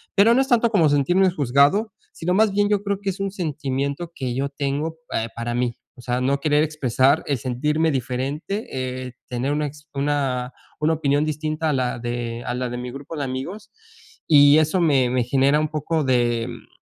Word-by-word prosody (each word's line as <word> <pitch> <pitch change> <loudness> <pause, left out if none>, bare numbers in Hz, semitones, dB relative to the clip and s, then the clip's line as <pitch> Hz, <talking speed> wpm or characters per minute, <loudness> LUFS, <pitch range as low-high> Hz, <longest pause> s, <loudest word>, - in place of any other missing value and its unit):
Pero 210 +4 +6
no 260 - +4
es 270 - -1
tanto 235 -3 +3
como 170 -8 +4
sentirnos 175 +6 +2
juzgado, 145 - +3 0.2
sino, 175 +2 -2
más 215 +2 +4
bien 205 +1 +2
yo 205 -1 +2
creo 200 -1 -1
que 200 -1 -2
es 185 - -10
un 195 0 -1
sentimiento 145 -2 -3
que 130 -3 -3
yo 135 +3 -1
tengo 145 +3 -3
pe 115 - -2
para 115 0 -3
mí. 120 -1 -1 0.2
O - - -9
sea, 125 +1 -2
no 140 +2 +1
querer 150 +1 +2
expresar 140 -1 +2
el 140 -3 -1
sentirme 150 +6 0
diferente, 135 - -3
eh, 130 -1 -4
tener 125 +3 -2
una 150 +1 0
ex 150 +1 -12
una 135 -3 -1 0.3
opinión 150 -2 +2
distinta 155 +1 -2
a - - +1
la 125 -2 -1
de 120 0 -4
a - - -2
la 125 0 -2
de 120 - -5
mi 125 0 -5
grupo 140 +5 -8
de 145 - -2
amigos. 155 +11 -5 0.6
Y 145 -1 +7
eso 155 +4 +1
me 140 -7 +3
me 125 0 +1
genera 135 +4 +3
un 155 0 -1
poco 155 +1 -1
de, 120 -3 +1
mm, - - -10
145 Hz, 200 wpm, -22 LUFS, 130-160 Hz, 0.6 s, Y